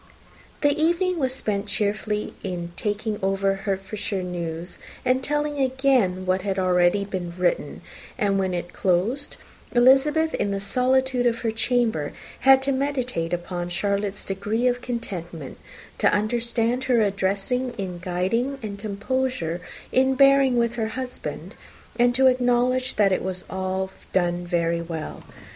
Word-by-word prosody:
The 290 Hz, -1 st, +3 dB
evening 345 Hz, +2 st, +2 dB
was 260 Hz, -3 st, +2 dB
spent 210 Hz, -5 st, -2 dB
chiefly 210 Hz, 0 st, -1 dB
in 175 Hz, -3 st, -4 dB
talking 210 Hz, 0 st, -2 dB
over 195 Hz, 0 st, +1 dB
Hertfordshire 195 Hz, 0 st, -3 dB
news, 170 Hz, -1 st, -4 dB, 0.3 s
and 255 Hz, +1 st, +2 dB
telling 295 Hz, +1 st, -1 dB
again 260 Hz, -8 st, +2 dB
what 185 Hz, 0 st, +1 dB
had 195 Hz, 0 st, -1 dB
been 190 Hz, -, 0 dB
already 180 Hz, +2 st, +3 dB, 0.3 s
written; 180 Hz, -1 st, 0 dB, 0.4 s
and 200 Hz, -1 st, +1 dB
when 190 Hz, -1 st, 0 dB
it 175 Hz, 0 st, -5 dB
closed, 200 Hz, +10 st, 0 dB, 0.4 s
Elizabeth, 270 Hz, +6 st, +4 dB
in 205 Hz, -, 0 dB
the 200 Hz, 0 st, -1 dB
solitude 255 Hz, +3 st, +2 dB
of 235 Hz, -1 st, 0 dB
her 225 Hz, -, 0 dB
chamber, 225 Hz, -, 0 dB, 0.3 s
had 265 Hz, +1 st, +6 dB
to 275 Hz, -, +1 dB
meditate 255 Hz, -11 st, -1 dB
upon 175 Hz, 0 st, -3 dB
Charlotte's 200 Hz, +2 st, -1 dB
degree 205 Hz, +5 st, -1 dB
of 245 Hz, 0 st, +2 dB
contentment, 175 Hz, -, -5 dB, 0.4 s
to -, -, +4 dB
understand 235 Hz, +3 st, 0 dB
her 245 Hz, -3 st, +3 dB
address 195 Hz, 0 st, 0 dB
in 240 Hz, -8 st, -2 dB
guiding, 190 Hz, +10 st, -1 dB
and 200 Hz, -2 st, -5 dB
composure 205 Hz, -4 st, -2 dB, 0.3 s
in 265 Hz, +1 st, +3 dB
bearing 275 Hz, -1 st, +5 dB
with, 235 Hz, 0 st, +2 dB
her 225 Hz, -2 st, -1 dB
husband, 255 Hz, -1 st, -5 dB, 0.5 s
and 245 Hz, 0 st, +4 dB
to 265 Hz, +1 st, +4 dB
acknowledge 255 Hz, 0 st, +2 dB
that 200 Hz, -2 st, +4 dB
it 185 Hz, -, +1 dB
was 185 Hz, 0 st, -4 dB
all 190 Hz, 0 st, -2 dB, 0.2 s
done 175 Hz, -1 st, +1 dB
very 170 Hz, -1 st, +1 dB
well. 165 Hz, -2 st, -6 dB
210 Hz, 140 wpm, -24 LUFS, 185-255 Hz, 0.5 s, had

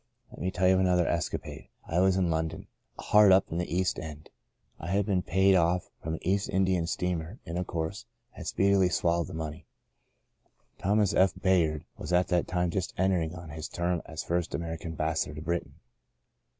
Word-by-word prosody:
" -, -, -44 dB
Let -, -, -11 dB
me 90 Hz, -, 0 dB
tell 95 Hz, 0 st, +1 dB
you 95 Hz, -, +6 dB
of 95 Hz, -, +3 dB
another 90 Hz, -2 st, +3 dB
escapade. 85 Hz, -1 st, -3 dB, 0.2 s
I 85 Hz, -, 0 dB
was 95 Hz, 0 st, +4 dB
in 90 Hz, -3 st, +1 dB
London 80 Hz, 0 st, -2 dB, 0.2 s
— -, -, -43 dB
hard 105 Hz, -2 st, +7 dB
up 95 Hz, +1 st, +4 dB
in 85 Hz, -, -1 dB
the 90 Hz, -, -3 dB
East 90 Hz, +1 st, 0 dB
End. 75 Hz, -1 st, -9 dB, 0.5 s
I 85 Hz, -, -7 dB
had 100 Hz, +3 st, +1 dB
been 95 Hz, -3 st, +1 dB
paid 95 Hz, +2 st, +3 dB
off 90 Hz, 0 st, +2 dB
from 80 Hz, +1 st, -3 dB
an -, -, -10 dB
East 100 Hz, +1 st, +1 dB
Indian 95 Hz, -3 st, +1 dB
steamer, 90 Hz, +2 st, -2 dB
and, 85 Hz, -, -5 dB
of 90 Hz, 0 st, -2 dB
course, 80 Hz, -1 st, -4 dB, 0.2 s
had -, -, -9 dB
speedily 100 Hz, -1 st, +3 dB
swal 85 Hz, -1 st, +1 dB
lowed 85 Hz, -, -2 dB
the -, -, -8 dB
money. 80 Hz, +1 st, -6 dB, 1.1 s
Thomas 105 Hz, 0 st, +2 dB
F. 95 Hz, -1 st, +3 dB
Bayard 85 Hz, -6 st, +2 dB
was 75 Hz, -, -6 dB
at 90 Hz, 0 st, +3 dB
that 90 Hz, -2 st, +1 dB
time 90 Hz, -1 st, 0 dB
just 95 Hz, -2 st, -3 dB
entering 90 Hz, -3 st, +1 dB
on 85 Hz, -1 st, -9 dB
his 80 Hz, +1 st, -6 dB
term 85 Hz, -1 st, -1 dB
as 80 Hz, -, -5 dB
first 85 Hz, -3 st, -1 dB
American 80 Hz, +1 st, -4 dB
Ambassador 80 Hz, -1 st, -1 dB
to 75 Hz, -, -6 dB
Britain. 85 Hz, 0 st, -3 dB
90 Hz, 200 wpm, -29 LUFS, 80-95 Hz, 1.1 s, hard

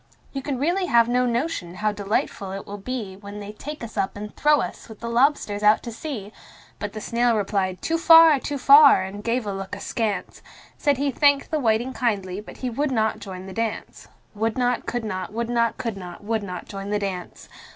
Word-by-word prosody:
"You 270 Hz, -, -3 dB
can 270 Hz, -1 st, -3 dB
really 350 Hz, +7 st, 0 dB
have 235 Hz, -4 st, +5 dB
no 250 Hz, +1 st, +2 dB
notion 235 Hz, -, -2 dB
how 215 Hz, +2 st, 0 dB
delightful 200 Hz, -1 st, -2 dB
it 195 Hz, -, -6 dB
will 205 Hz, 0 st, -7 dB
be 215 Hz, -3 st, -5 dB
When 200 Hz, +1 st, -9 dB
they 205 Hz, 0 st, -7 dB
take 295 Hz, +6 st, -8 dB
us 225 Hz, -1 st, -8 dB
up 195 Hz, 0 st, -1 dB
and 210 Hz, +1 st, -7 dB
throw 295 Hz, 0 st, +4 dB
us, -, -, -6 dB
with 220 Hz, -, -11 dB
the 235 Hz, -, -6 dB
lobsters, 235 Hz, -4 st, +2 dB
out 210 Hz, +1 st, +4 dB
to 235 Hz, -, -5 dB
sea!" 225 Hz, -5 st, -6 dB, 0.5 s
But 205 Hz, -1 st, -4 dB
the 215 Hz, -, -5 dB
snail 235 Hz, +1 st, +1 dB
replied 195 Hz, -2 st, -1 dB
"Too 330 Hz, 0 st, 0 dB
far, 325 Hz, -3 st, +8 dB
too 285 Hz, +2 st, -4 dB
far!" 280 Hz, -4 st, +7 dB
and 200 Hz, +2 st, -7 dB
gave 235 Hz, +1 st, 0 dB
a 200 Hz, -, -3 dB
look 195 Hz, +1 st, -5 dB
askance 205 Hz, -2 st, -3 dB, 0.3 s
Said 285 Hz, -3 st, +1 dB
he 280 Hz, +1 st, 0 dB
thanked 285 Hz, +2 st, +3 dB
the 310 Hz, -, +1 dB
whiting 235 Hz, +1 st, +1 dB
kindly, 200 Hz, -6 st, -1 dB
but 210 Hz, -, -12 dB
he -, -, 0 dB
would 285 Hz, +4 st, -1 dB
not 220 Hz, -3 st, 0 dB
join 185 Hz, -2 st, -8 dB
the 190 Hz, -, -8 dB
dance. 225 Hz, +1 st, -4 dB, 0.3 s
Would 220 Hz, +2 st, -1 dB
not, 245 Hz, -1 st, 0 dB
could 240 Hz, -2 st, -2 dB
not, 185 Hz, -1 st, -4 dB
would 235 Hz, +1 st, -2 dB
not, 235 Hz, -1 st, +1 dB
could 230 Hz, -4 st, -4 dB
not, 180 Hz, +1 st, -9 dB
would 220 Hz, +1 st, -1 dB
not 180 Hz, -3 st, -6 dB
join 195 Hz, 0 st, -6 dB
the 210 Hz, -, +1 dB
dance. 190 Hz, -3 st, -5 dB
220 Hz, 215 wpm, -24 LUFS, 200-255 Hz, 0.5 s, far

